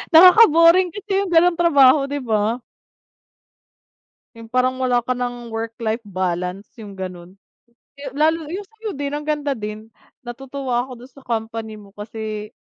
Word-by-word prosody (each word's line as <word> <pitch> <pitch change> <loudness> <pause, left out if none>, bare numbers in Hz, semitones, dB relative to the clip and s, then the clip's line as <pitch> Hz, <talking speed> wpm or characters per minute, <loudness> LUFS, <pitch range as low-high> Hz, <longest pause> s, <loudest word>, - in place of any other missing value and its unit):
nakaka-boring 355 -1 +7
kasi 410 0 -8
yung 370 - -5
ganung 340 +1 +4
trabaho 280 -4 +5
'di 285 +1 -3
ba? 220 +1 0 1.7
Yung 230 0 -11
parang 255 +2 0
wala 245 -2 +1
ka 255 - -3
ng 245 -1 -4
work-life 225 0 -4
balance 185 +1 -3
yung 205 -3 -10
ganun. 185 -1 -8 0.6
Yu 280 -1 -7
lalo 315 +2 +1
yung 385 +4 -4
sayo 445 0 -8
din, 285 0 -4
ang 295 0 -5
ganda 295 -1 -1
din, 215 0 -7 0.4
natutuwa 255 0 -3
ako 260 - -11
dun 250 +2 -14
sa 275 +2 -17
company 225 -1 -4
mo 200 -1 -15
kasi 215 0 -6
245 Hz, 145 wpm, -20 LUFS, 220-295 Hz, 1.7 s, nakaka-boring